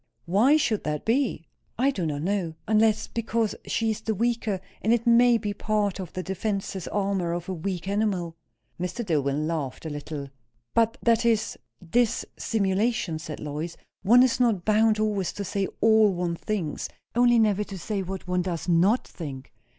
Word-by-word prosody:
"Why 225 - +4
should 225 -8 0
that 150 -1 -2
be?" 230 - +1 0.3
"I 265 +4 +3
do 180 -11 -2
not 145 -1 -3
know 180 -4 -1
unless 220 0 +3
because 230 -1 -1
she 225 -1 +1
is 215 - -4
the 220 0 -1
weaker, 225 -2 0 0.2
and 220 - +1
it 235 0 +2
may 240 0 +6
be 210 -2 -3
part 205 -1 -1
of 185 -3 -6
the 185 - -4
defensive 195 -1 -3
armour 195 -4 0
of 175 0 -4
a 190 - -2
weak 180 +1 -4
animal." 195 -5 -1 0.4
Mr. 180 +7 -3
Dillwyn 150 -3 0
laughed 155 -4 -3
a 160 - -4
little. 145 -1 -6 0.4
"But 230 0 +2
that 230 0 +3
is 225 -2 +1 0.3
_dis_simulation," 210 -3 0
said 155 -2 -7
Lois. 150 +3 -5 0.2
"One 240 +6 +6
is 255 -1 +2
not 225 -8 +2
bound 215 0 +4
always 210 -4 0
to 200 - -4
say 195 0 -1
all 220 -2 +5
one 175 -2 -2
thinks; 170 -5 -3 0.2
only 240 0 +4
never 210 -2 +3
to 195 - -7
say 195 +3 -3
what 190 0 -6
one 180 0 +1
does 175 -2 -3
not 180 +8 +3
think." 140 -5 -8
200 Hz, 175 wpm, -26 LUFS, 175-225 Hz, 0.4 s, may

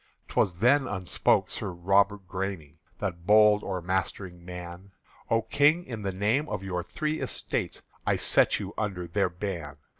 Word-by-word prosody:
'T - - -10
was 90 - +2
then 130 +8 +4
upspoke 95 -5 +1
Sir - - -3
Robert 95 +2 +2
Græme, 95 -5 -5 0.2
The 100 -2 -1
bold 105 +4 +4
o'ermastering 95 0 -3
man: 90 +2 -9 0.4
"O 115 0 +2
King, 145 +9 +3
in 115 -4 -6
the 100 -1 -2
name 110 +11 0
of 100 -2 -3
your 90 -2 -2
Three 155 - -3
Estates - - -2 0.2
I - - +2
set - - +3
you - - -6
under 95 -5 -2
their 100 +4 0
ban! 85 -6 -5
95 Hz, 155 wpm, -28 LUFS, 90-105 Hz, 0.4 s, then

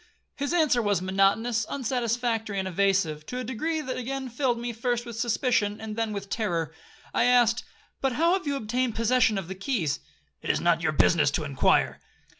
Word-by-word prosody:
His 285 +1 -2
answer 310 -8 +3
was 205 -3 +1
monotonous, 195 +5 +2
unsatisfactory, 235 -4 -1
and 190 -1 -1
evasive, 185 -5 +1
to 250 - -5
a 255 - -3
degree 310 +7 -2
that 260 -3 -4
again 265 +1 -4
filled 245 0 0
me 240 0 -4
first 240 +1 -1
with 235 -1 -7
suspicion, 235 -3 +1
and 220 -1 -6
then 225 -1 -1
with 200 -1 -5
terror. 170 -8 -2 0.4
I 235 - +3
asked, 245 -1 +4 0.4
'But 270 -2 +1
how 335 +7 +3
have 375 -5 -1
you 285 - 0
obtained 245 0 -1
possession 230 -1 +3
of 190 -4 -4
the 190 - -5
keys?'—'It 140 - -4
is - - +2
not 170 -1 +2
your 165 -2 +1
business 155 -1 +4
to 155 +3 -1
inquire.' 140 -3 +2
225 Hz, 185 wpm, -27 LUFS, 190-250 Hz, 0.4 s, asked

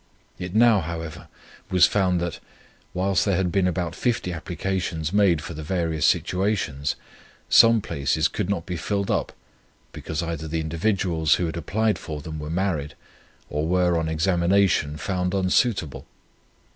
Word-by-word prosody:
It 90 +2 -5
now, 115 -2 +6
however, 80 -1 -6 0.4
was 90 -1 +6
found 90 -3 +1
that, 85 -2 -3 0.5
whilst 95 +1 +1
there 100 -3 +1
had 95 -2 0
been 95 -1 +2
about 85 -1 -2
50 105 -3 -1
applications 85 -1 -3
made 95 -6 +3
for - - -6
the 80 - -7
various 80 -2 0
situations, 90 -7 0 0.5
some 115 -1 +6
places 70 0 0
could 90 - -3
not 100 -5 -1
be 90 -1 -4
filled 100 +3 -1
up, - - -1 0.6
because 80 +1 -4
either 80 -2 -4
the 80 +1 -2
individuals, 80 -1 +1
who 90 - -1
had 80 - -4
applied 105 +4 0
for 75 -2 -6
them, 80 +1 -7
were 75 0 -6
married, 85 -4 -2 0.5
or 75 +2 -2
were, 90 0 +2
on 80 -1 0
examination, 85 -1 +2
found 90 +2 -2
unsuitable. 95 - 0
90 Hz, 150 wpm, -24 LUFS, 80-95 Hz, 0.6 s, now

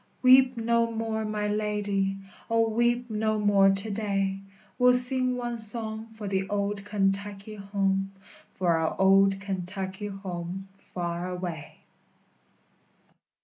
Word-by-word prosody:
_Weep 255 0 +6
no 230 0 +1
more, 220 -1 -2
my 210 -1 -2
lady; 205 -2 -1 0.3
O, 230 0 +3
weep 240 +2 +1
no 215 0 0
more 205 -2 +4
to 195 +2 +2
day! 195 -2 -1 0.4
We'll 250 0 +6
sing 255 0 +1
one 240 -1 -3
song 220 0 0
for 220 -2 -8
the 195 0 -1
old 200 0 -2
Kentucky 200 0 -2
home, 195 -1 -1 0.4
For 175 -3 +2
our 160 +2 -1
old 195 0 +5
Kentucky 190 +1 -5
home 190 -1 -6
far 175 -2 -5
away. 175 -4 -6
205 Hz, 120 wpm, -27 LUFS, 195-220 Hz, 0.4 s, Weep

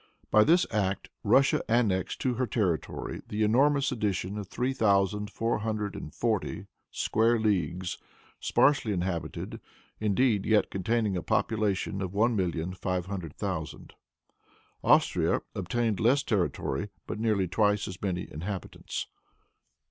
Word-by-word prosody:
By 110 0 +7
this 175 +8 +4
act, 100 -3 -1
Russia 135 0 +4
annexed 100 -6 +1
to 130 - +1
her 130 +1 -1
territory 100 -7 -2
the 105 +1 -1
enormous 140 +6 +3
addition 100 -5 -1
of 100 - -6
three 125 +6 -1
thousand 105 -3 +2
four 115 +2 -1
hundred 105 -2 -2
and 75 - -7
forty 110 0 -1 0.2
square 115 +2 +2
leagues, 95 -4 -1 0.4
sparsely 135 -7 +3
inhabited, 85 -4 -3 0.4
indeed, 105 0 +2
yet 110 -1 +3
containing 105 +1 0
a 90 - -1
population 100 0 0
of 95 0 -4
one 115 +3 +3
million 90 -2 -1
five 90 -1 -2
hundred 90 -5 -6
thousand. 90 -6 -5 0.9
Austria - - +3
obtained 110 +2 -1
less 130 +5 +3
territory, 95 - -1 0.2
but - - -5
nearly 105 -4 +1
twice 105 +3 +1
as 90 -1 -8
many 90 -3 -2
inhabitants. 90 +4 -5
105 Hz, 130 wpm, -28 LUFS, 95-115 Hz, 0.9 s, By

